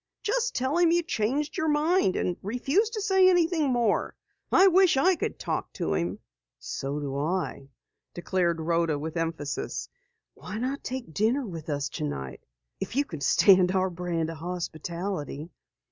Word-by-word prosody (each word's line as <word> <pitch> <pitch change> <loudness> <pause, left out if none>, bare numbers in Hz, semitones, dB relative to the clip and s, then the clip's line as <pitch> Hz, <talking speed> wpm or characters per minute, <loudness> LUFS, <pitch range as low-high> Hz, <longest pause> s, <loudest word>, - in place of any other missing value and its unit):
"Just 485 +2 0
tell 265 +6 0
him 345 -1 +5
you 345 +1 +3
changed 285 +1 -1
your 315 - 0
mind 305 - +2
and 180 - 0
refuse 270 - +1
to 455 -2 -4
say 380 -2 +5
anything 335 -4 +2
more. 240 -4 +1 0.4
I 380 - +6
wish 375 -4 +5
I 365 +7 +4
could - - -3
talk - - -3
to 80 - -2
him." 85 +5 -1 0.4
"So 140 +2 -4
do 140 -2 -4
I," 150 -4 -2 0.5
declared 175 -1 0
Rhoda 165 -1 +1
with 155 +2 -5
emphasis. 165 -4 -3 0.4
"Why 185 +4 -7
not 260 +4 -3
take 255 -10 -5
dinner 235 - +1
with 165 -6 -7
us 145 -1 -1
tonight 70 -3 -5 0.4
if - - -5
you 285 +1 +2
can 160 - -8
stand 185 +5 +5
our 190 -1 +1
brand 170 -2 -2
of 165 - -8
hospitality." 170 -2 -4
190 Hz, 160 wpm, -27 LUFS, -, 0.5 s, I